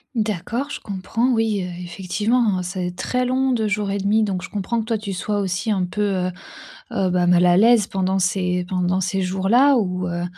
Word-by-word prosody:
D'accord, 225 +6 -2
je - - -6
comprends, 210 +5 -2
oui, 225 -4 +1
heu, 180 - -5
effectivement, 205 +3 0
c'est 180 -1 -4
très 250 0 -1
long 260 +1 +1
2 220 -3 0
jours 205 -1 -1
et 200 - -1
1/2 210 +3 +2
donc 190 -3 -2
je - - -7
comprends 220 +3 -2
que - - -7
toi, 225 -1 0
tu 200 -2 -5
sois 205 +3 -2
aussi 195 +3 -1
un 190 -3 +1
peu, 210 +4 -4 0.2
heu 185 - -2 0.6
heu, 190 -1 0
bah, 180 -1 +2
mal 180 0 +5
à 175 0 +5
l'aise 225 -1 +5
pendant 190 0 0
ces 180 -1 0
pendant 185 0 0
ces 190 +1 -1
jours-là 210 +9 +3
où, 180 -4 -1
heu, 175 0 -3
195 Hz, 210 wpm, -21 LUFS, 180-220 Hz, 0.6 s, mal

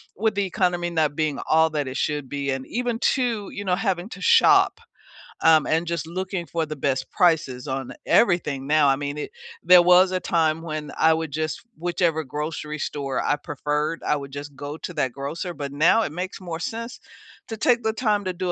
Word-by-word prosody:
with 220 +1 0
the 200 - +1
economy 180 -2 0
not 155 -3 +1
being 155 -2 -1
all 160 +1 +4
that 145 -3 -2
it 130 - -5
should 145 -3 -2
be, 140 -1 -2
and 135 0 -3
even 240 -1 -2
too, 235 -6 0
you 200 - -6
know, 180 -1 +2
having 190 -2 -1
to - - -10
shop, 470 0 +5 0.6
um, 160 -1 +5
and 165 +2 +1
just 170 -1 -3
looking 185 +1 -4
for 165 -1 -1
the 155 0 -6
best 135 -1 -1
prices 150 -8 +1
on 135 -1 -4
everything 170 - +2
now. 150 -1 +4
I 135 - +4
mean, 145 +1 -4
it - - -5 0.3
There 180 -1 +8
was 180 +1 +6
a 185 - 0
time 165 -2 +1
when 155 -2 -5
I 160 - +5
would 160 -2 -3
just 155 +1 -3 0.2
whichever 170 -1 0
grocery 150 +2 -5
store 140 -3 -3
I 145 - +2
preferred, 150 +2 -3
I - - +1
would 140 -1 -6
just 145 0 -8
go 145 +2 -6
to 180 - -7
that 130 -5 0
grocer, 150 +7 -5
but 140 -3 -6
now 165 +10 +4
it - - -3
makes 185 +3 -5
more 170 -3 -5
sense 230 +6 -5 0.5
to 225 - -6
take 235 +2 +2
the 220 0 0
time 210 -4 0
to 185 - -2
do 180 0 -2
160 Hz, 205 wpm, -24 LUFS, 145-185 Hz, 0.6 s, There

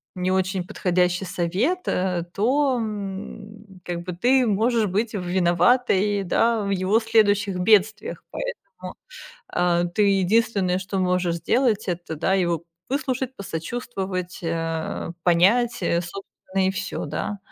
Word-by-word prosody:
не 180 0 -1
очень 185 -1 0
подходящий 180 0 0
совет, 185 - -1
э, 180 -2 0
то, 260 +5 +2
м, 205 -1 -7
как 175 -1 -4
бы 180 0 -5
ты 250 +8 +3
можешь 225 +2 +2
быть 215 +4 -1
виноватой, 190 +3 +2
да, 225 +5 +2
в 200 - -3
его 195 +3 +2
следующих 210 -4 +2
бедствиях. 210 +2 +2
Поэтому, - - -7 0.6
а, 175 -1 +1
ты 175 +5 0 0.2
единственное, 195 -2 +2
что 190 +1 -3
можешь 180 -2 +1
сделать, 220 +5 +1
это, 175 -2 -4
да, 190 +5 +1
его 170 -3 0 0.2
выслушать, 265 -2 -2
посочувствовать, 190 0 -4
э, 165 0 -3
понять, 200 +8 +3
а, 170 - +1
собственно, 190 +1 -4
и - - +2
всё, 195 +1 -4
да. 155 +7 -4
195 Hz, 125 wpm, -23 LUFS, 180-220 Hz, 0.6 s, ты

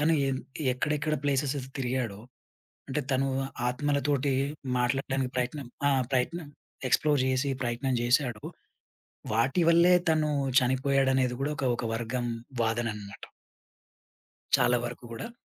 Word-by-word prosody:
తను 160 +2 +3
ఎన్ 130 -1 -1 0.3
ఎక్కడెక్కడ 150 +3 0
ప్లేసెసెస్ 135 -1 0
తిరిగాడో, 120 -5 -2 0.7
అంటే, 140 +2 -1
తనూ 135 +1 +2 0.4
ఆత్మలతోటి 140 +1 0 0.5
మాట్లాడడానికి 130 +1 0
ప్రయత్నం 125 +1 -2 0.2
ఆ! - - +4 0.2
ప్రయత్నం 150 +5 -1 0.4
ఎక్స్‌ప్లోర్ 145 +1 +3
జేసి, 130 +2 +1
ప్రయత్నం 125 +2 -1
జేశాడో, 120 -2 +1 0.9
వాటి 135 +10 +2
వల్లే 170 +2 +6 0.2
తనూ 155 -1 +1 0.3
చనిపోయాడనేది 130 0 +2
గూడా 150 +2 0
ఒక 135 - -1
ఒక 125 - -4
వర్గం 120 +1 -2 0.4
వాదననమాట. 110 -3 -3 1.3
చాలా 125 0 +3
వరకు 120 +1 -7
గూడా. 115 - -6
130 Hz, 110 wpm, -28 LUFS, 125-145 Hz, 1.3 s, వల్లే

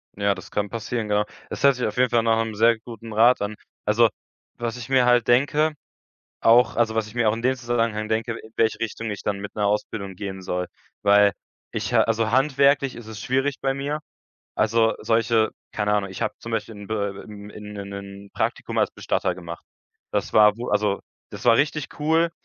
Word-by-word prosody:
Ja, 100 0 +1
das - - -11
kann 105 0 -1
passieren. 115 0 -3
Genau 105 0 +2 0.2
Das - - -6
hört 140 -1 +6
sich 125 - -2
auf - - -3
jeden 125 0 +4
Fall 115 -1 +2
nach 115 0 +3
‘nem 110 -2 -5
sehr 115 +2 +4
guten 115 -1 -9
Rat 115 +2 +5
an. 105 +1 -2 0.3
Also, 115 +2 +4 0.5
was 120 0 -3
ich 120 0 -8
mir 130 -2 +4
halt 120 -2 +4
denke 145 +5 +3 0.7
auch 120 +2 +5
also, 115 -2 +2
was 110 -1 0
ich 110 - -13
mir 120 -2 +1
auch - - -1
in 115 - -5
dem 130 +1 +2
Zusammenhang 115 -3 -1
denke: 110 +2 0
„In 110 0 -10
welche 110 -1 +2
Richtung 115 0 -4
ich 100 - -5
dann 100 -1 -1
mit 105 - -7
‘ner 105 -1 0
Ausbildung 100 -1 -2
gehen 95 0 -6
soll“, 90 0 -2 0.4
weil 100 0 +5 0.4
ich - - -3
ha - - +6
also, 115 0 0
handwerklich 140 0 +3
ist 120 -2 -10
es 110 -1 -8
schwierig 135 +2 0
bei 135 0 +2
mir. 145 +3 -3 0.6
Also, 115 +1 +3
solche 115 -1 +2 0.2
keine 105 -1 0
Ahnung, 100 -2 0
ich 95 - -8
habe - - 0
zum 115 - -8
Beispiel 115 0 -3
in 100 -1 -10
be 100 -2 -2
be 100 - -10 0.3
in 105 0 -9
'nen 100 -1 -6
'nen 100 0 -9
Praktikum - - -2
als - - +2
Bestatter - - -1
gemacht. 85 -2 -8 0.5
Das - - -2
war 105 0 +6
wo 120 +1 -5
also, 100 -1 +1 0.3
das - - -9
war 115 - +7
richtig 150 +1 +1
cool. 160 +2 +3
115 Hz, 210 wpm, -24 LUFS, 105-120 Hz, 0.7 s, war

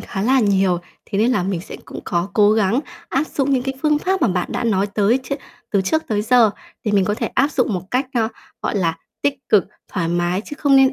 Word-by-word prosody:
khá 195 - -4
là 260 +4 +4
nhiều, 195 -4 +2 0.3
thế 200 - -1
nên 225 +4 +3
là 200 - +1
mình 185 -2 -2
sẽ - - -9
cũng - - -8
có 175 +2 -1
cố 210 -1 +5
gắng 215 +3 +2 0.3
áp 275 +4 0
dụng 280 -2 -1
những 260 -2 +2
cái 270 +1 -3
phương 300 -1 +3
pháp 380 +4 0
mà - - +4
bạn 180 -1 -1
đã 245 - -2
nói 200 -3 +2
tới 205 +4 +2
tr - - -5 0.4
từ 200 - +2
trước 315 +12 +1
tới 210 -2 0
giờ, 230 -1 +5 0.3
thì 210 - 0
mình 195 -2 +4
có 210 - 0
thể - - -2
áp 275 +4 +1
dụng 250 -8 +1
một 180 - -2
cách, 260 +2 +1
ơ, 225 -2 +2 0.3
gọi - - -1
là, 165 -4 +1 0.3
tích 285 -1 +2
cực, 205 -4 +5 0.3
thoải 170 -4 -1
mái, 175 +3 0
chứ 295 - -8
không 280 -2 +4
nên 270 0 +6
215 Hz, 255 wpm, -20 LUFS, 195-265 Hz, 0.4 s, nên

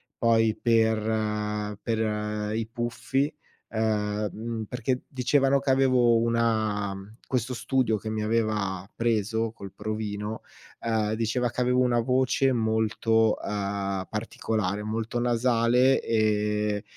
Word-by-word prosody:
poi 115 -1 +3
per 110 -2 0
per 105 -1 -1
i 110 -1 -2
Puffi 130 +5 -1 0.4
ehm, 105 -1 0
mhmm, 115 0 -4
perché 125 +3 -2
dicevano 135 +1 +2
che 140 - -3
avevo 130 -3 +4
una 110 -3 +1
mhmm, 100 +3 -10
questo 125 0 -1
studio 125 -2 +1
che 110 +2 -6
mi 110 0 -2
aveva 105 -4 -1
preso 115 -1 0
col 100 -4 -10
provino, 105 0 -4 0.4
ehm, 110 -2 0
diceva 115 +2 0
che 125 - -2
avevo 125 +1 +2
una 120 -1 +2
voce 130 +2 +2
molto, 110 -1 +2
ehm, 100 -2 -2
particolare, 105 -2 -2
molto 110 +2 -2
nasale 120 +2 +3
e 105 -1 +1
110 Hz, 115 wpm, -27 LUFS, 105-120 Hz, 0.4 s, avevo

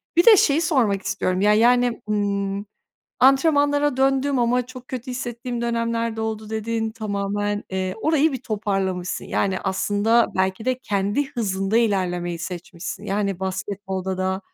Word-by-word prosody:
bir 345 - +5
de 440 -4 +9
şeyi 295 0 +3
sormak 240 - +2
istiyorum. 185 -1 -1
Ya, 210 +1 +5
yani, 240 +1 +3
ımm, 200 -1 -1 0.6
"Antrenmanlara 285 +1 +4
döndüm 270 +1 +2
ama 245 +1 +1
çok 255 0 -11
kötü 255 0 -5
hissettiğim 240 -1 -4
dönemler 230 -1 -1
de 225 - -3
oldu." 220 -1 -4
dedin. 220 0 -2
Tamamen, 205 -1 -2
eee, 185 0 -2
orayı 315 -1 +3
bir 260 -1 -5
toparlamışsın. 195 -5 -2
Yani 190 -2 0
aslında 205 +4 +2
belki 190 +3 0
de 255 0 0
kendi 205 +5 -1
hızında 195 -3 -1
ilerlemeyi 180 -6 0
seçmişsin. 180 +3 -6
Yani 200 -2 -1
basketbolda 190 0 -3
da 190 +1 -1
215 Hz, 140 wpm, -23 LUFS, 195-245 Hz, 0.6 s, de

